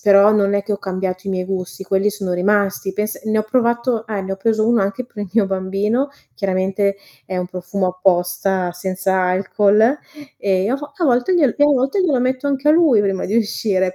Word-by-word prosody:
però 200 0 +6
non 200 -1 +2
è 200 - +1
che 210 - -3
ho 200 - -2
cambiato 185 0 -4
i - - -1
miei 185 -1 -2
gusti, 185 0 -5
quelli 195 +2 +1
sono 195 -3 -4
rimasti. 200 +1 0
Pens 210 +1 -3
ne 220 0 +1
ho - - +2
provato 235 0 0
eh, 210 -3 -3
ne 190 0 -4
ho - - -4
preso 215 +2 +1
uno 235 -2 +3
anche 200 +5 -2
per 240 -2 -17
il - - -11
mio 215 -3 +3
bambino. 195 +8 -1 0.2
Chiaramente, 195 +1 0 0.3
è 185 - -5
un 180 - -2
profumo 185 +1 -3
apposta, 180 0 0
senza 190 +1 -1
alcol, 200 +7 +2 0.4
e 190 0 0
a 255 - +1
vo 290 0 -9
a 350 - -2
volte 250 +5 +2
glie 315 -6 +4
glielo 290 0 +4
metto 275 +9 -1
glielo 315 -9 +2
metto 255 +2 -1
anche 280 +1 0
a - - +7
lui 310 -9 +4
prima 195 -2 -1
di 210 - 0
uscire, 195 -4 0
200 Hz, 210 wpm, -19 LUFS, 190-235 Hz, 0.4 s, a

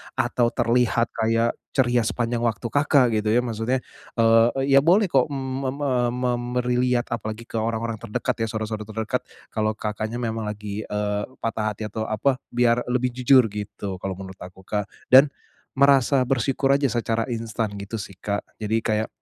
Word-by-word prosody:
atau 120 -1 +1
terlihat 120 0 +2
kayak 115 +1 +1 0.2
ceria 125 -2 +3
sepanjang 120 0 -1
waktu 115 -4 -1
Kakak 145 -4 +4
gitu 105 - -3
ya, 125 - +3
maksudnya, 120 +2 -1 0.3
eee, 115 0 +5
e 135 - 0
ya 135 - +8
boleh 180 +6 +3
kok, 135 -2 +4
mmm, 135 -2 -4
mem 130 +2 -3
e 140 - +1 0.2
mem 125 -1 0 0.2
meriliat 125 0 0
apalagi 110 -1 -4
ke 115 -1 -4
orang-orang 115 0 -2
terdekat 120 +2 -3
ya, 115 - 0
saudara-saudara 110 -1 -4
terdekat, 110 +3 -2 0.3
kalau 110 -1 0
Kakaknya 110 +1 -4
memang 115 -2 -2
lagi, 105 0 -5
eee, 105 0 -1 0.2
patah 110 -2 -1
hati 110 - -7
atau 110 +1 -3
apa, 130 +5 +1 0.2
biar 120 0 +2
lebih 125 0 0
jujur 125 -2 +4
gitu 100 -2 -5
kalau 95 0 -4
menurut 95 0 -10
aku, 90 +1 -11
Kak. 105 +1 -2 0.2
Dan 135 +3 +9 0.5
merasa 140 0 +4
bersyukur 135 +1 +1
aja 140 0 +2
secara 115 -1 0
instan 115 -2 -2
gitu 100 +3 -6
sih, 100 - -7
Kak. 100 0 -2 0.2
Jadi 110 +1 -1
kayak 110 0 0
115 Hz, 170 wpm, -24 LUFS, 110-125 Hz, 0.5 s, Dan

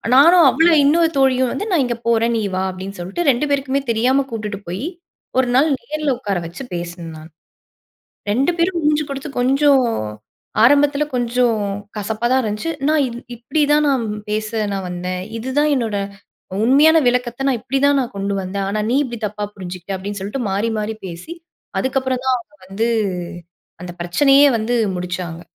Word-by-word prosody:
நானும், 335 +5 +7
அவளும் 325 +3 +4
இன்னொரு 325 +3 +4
தோழியும் 260 -2 +3
வந்து 410 +10 -3
"நான் 330 -7 +3
இங்கே 240 -1 -3
போறேன். 230 0 +2
நீ 220 - -1
வா" 190 - 0
அப்படின்னு 190 +2 -8
சொல்லிட்டு 195 - -3
2 255 +4 -1
பேருக்குமே 275 0 0
தெரியாம 255 +5 +2
கூட்டுட்டு 210 -3 -4
போய். 185 +9 -4 0.5
ஒரு 260 - +2
நாள் 280 +4 +5
நேரில 305 -2 -2
உக்கார 200 -6 -2
வச்சு 170 +11 -8
பேசினேன் 170 -1 -6
நானு. 155 +1 -12 1.0
2 265 +9 +2
பேரும் 345 +1 +1
மூஞ்சு 300 0 +2
கொடுத்து 275 +1 -5
கொஞ்சம் 270 +1 +4 0.8
ஆரம்பத்தில 285 +3 +4
கொஞ்சம் 240 -1 +1 0.4
கசப்பா 215 +3 -2
தான் 260 +1 +4
இருந்துச்சு. 215 +8 -3 0.2
நான் 310 -1 +3
இது 235 0 -7 0.2
இப்படி 245 +7 -2
தான் 300 0 +4
நான் 265 -4 +1 0.3
பேச 215 0 -2 0.2
நான் 195 -1 -3
வந்தேன். 180 +1 -4 0.2
இதுதான் 265 +6 0
என்னோட 230 -6 -1 0.7
உண்மையான 295 +6 +6
விளக்கத்த 245 +2 0
நான் 250 -3 0
இப்படிதான் 275 +2 +2
நான் 250 -1 -5
கொண்டு 200 0 -2
வந்தேன். 195 +1 -3
ஆனா 210 +1 -1
நீ 255 - +2
இப்படி 240 -4 -6
தப்பா 210 0 -5
புரிஞ்சுகிட்ட 185 0 -6
அப்படின்னு 200 +2 -5
சொல்லிட்டு 210 +7 -3
மாறி 205 +4 0
மாறி 215 +1 -3
பேசி 175 - -7 0.5
அதுக்கப்புறம் 260 -1 -1
தான் 260 -1 +3
அவங்க 230 -4 -13
வந்து 215 +5 -1 0.9
அந்த 180 - -6
பிரச்சனையே 275 +11 +5
வந்து 225 +2 -1 0.2
முடிச்சாங்க. 175 -2 -5
240 Hz, 160 wpm, -19 LUFS, 200-275 Hz, 1.0 s, நானும்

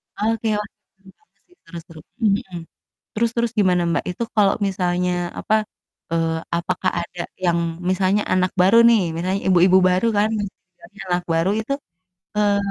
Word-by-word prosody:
Oke, 225 +1 -1
wah, 210 - -5 0.3
seru 195 0 -20
banget 430 - -40
sih, 355 - -26
seru-seru, 165 -1 -11 0.2
mhm. 195 -3 0 0.6
Terus 230 +1 +1
terus 235 -1 0
gimana, 180 -3 +3
Mbak, 170 - -1
itu 180 - -5
kalau 200 -2 +4
misalnya, 180 -1 0 0.3
apa, 215 - 0 0.6
eee, 165 -1 0 0.2
apakah 185 +2 -1
ada 170 0 -8 0.2
yang 170 -1 +2 0.3
misalnya 190 +2 +1
anak 185 0 +1
baru 190 +5 +5
nih, 230 -3 +5 0.2
misalnya 185 +3 -1
ibu-ibu 185 0 +5
baru 185 +5 +1
kan 215 +2 +2 0.2
istilahnya 180 +3 -19
anak 175 0 0
baru 165 +4 +1
itu, 235 +5 -4 0.6
eee, 205 -1 +2
185 Hz, 150 wpm, -21 LUFS, 175-210 Hz, 0.6 s, baru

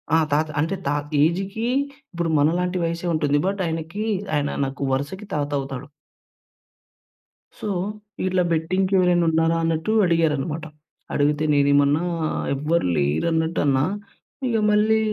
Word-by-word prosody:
ఆ! - - +6
తాత 155 +2 +3
అంటే 165 +6 0
తా - - +1 0.3
ఏజ్‌కి 195 +7 0 0.5
ఇప్పుడు 170 -1 -1
మనలాంటి 180 +4 +1
వయస్సే 170 +1 -2
ఉంటుంది. 145 -2 +2
బట్ 195 0 -1
ఆయనకి 165 +6 -3 0.3
ఆయన 145 -1 0 0.2
నాకు 135 +1 -6
వరుసకి 145 +10 -3
తాత 145 -1 -1
అవుతాడు. 135 +1 -6 1.7
సో, - - -4 0.6
"ఇట్లా 185 -1 +2
బెట్టింగ్‌కి 185 +4 0
ఎవరైనా 175 -1 +3
ఉన్నారా?" 165 +1 +2
అన్నట్టు 165 +5 0
అడిగారనమాట. 160 -1 0 0.5
అడిగితే 145 +1 +1
నేనేమన్నా 145 +2 +3 0.5
ఎవ్వరు 150 - 0
లేరన్నట్టు 160 - 0
అన్నా. 135 -1 +3 0.6
ఇగ 230 -2 +1
మళ్ళీ 215 +1 +3
165 Hz, 120 wpm, -23 LUFS, 145-180 Hz, 1.7 s, ఆ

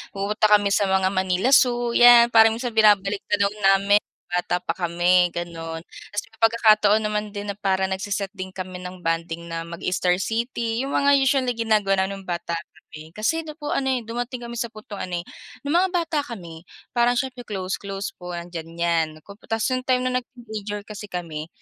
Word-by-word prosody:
pumupunta 210 +2 +3
kami 205 -1 +1
sa 200 0 +2
mga 190 0 +2
Manila 190 +5 +1
Zoo, 240 -3 +4
'yan. 240 0 +7
Parang 225 -1 +6
minsan 240 +1 -3
binabalik 205 -2 +4
tanaw 200 -1 +2
namin 200 0 +3
nung - - -56
bata 180 0 0
pa 165 - -1
kami, 175 0 +3
gano'n. 165 -1 -5
Tapos 205 +3 -7
may 225 - -24
pagkakataon 215 -2 +5
naman 210 0 -1
din 205 0 -5
na - - -8
parang 190 -1 0
nagse-set 200 0 -3
din 190 -2 -7
kami 185 -1 -6
ng 180 0 -9
bonding 165 0 -2
na 165 0 -3
mag-Star 180 +1 0
City, 230 +2 -2
yung 275 - -4
mga 285 0 +4
usual 270 0 +2
na 245 - +1
ginagawa 215 -3 +2
namin 195 0 -5
nung - - -22
bata 170 -1 -3
kami. 160 -1 -9
Kasi 225 +10 0
ano 305 -1 -9
po 295 -2 -5
ano, 270 - 0
eh, 255 -2 0
dumating 240 +2 -5
kami 235 0 -6
sa 235 - -1
puntong 215 -2 -10
ano, 175 -1 -3
eh, - - -36 0.4
nung 285 +3 -1
mga 375 +1 +2
bata 335 -3 0
kami 170 -8 -9 0.3
parang 240 0 +3
siyempre, 250 -2 -4
close-close 195 0 -4
po 180 0 -7
andiyan 170 -1 -7
'yan. 170 -1 +2 0.4
Tapos 225 -1 -1
yung 255 0 -1
time 255 -1 +2
na 255 0 +1
nag-teenager 215 -5 -7
kasi 210 -1 -8
kami, 165 -4 -5
205 Hz, 190 wpm, -23 LUFS, 180-235 Hz, 0.4 s, yan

